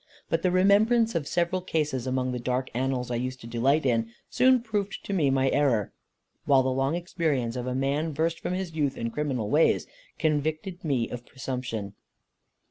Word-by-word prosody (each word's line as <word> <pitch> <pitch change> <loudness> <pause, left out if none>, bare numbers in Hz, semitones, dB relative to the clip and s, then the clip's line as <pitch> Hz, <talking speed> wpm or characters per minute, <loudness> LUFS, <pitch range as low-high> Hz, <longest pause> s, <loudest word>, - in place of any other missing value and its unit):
But - - +1
the 185 - +2
remembrance 215 +5 +4
of 160 -5 -2
several 175 +1 0
cases, 150 -8 -1
among 130 0 0
the 125 - -3
dark 125 +2 -2
annals 125 0 -1
I 120 - 0
used 130 +1 -3
to - - -10
delight 130 +6 +1
in, 115 -3 +1 0.2
soon 255 +1 +5
proved 210 -3 -3
to 200 - -3
me 155 -7 +2
my 135 0 +2
error; 130 -8 +2 0.5
while 135 -2 +5
the 130 - 0
long 135 +4 0
experience 155 -9 -1
of 125 0 -4
a 125 - -2
man, 140 +4 0
versed 160 +3 -1
from - - -3
his 185 -3 -4
youth 145 -4 -1
in 115 0 -3
criminal 130 -7 -2
ways, 155 +2 +3 0.3
convicted 155 +4 -1
me 135 -7 0
of 125 -1 -6
presumption. 125 -6 -5
140 Hz, 185 wpm, -27 LUFS, 125-170 Hz, 0.5 s, soon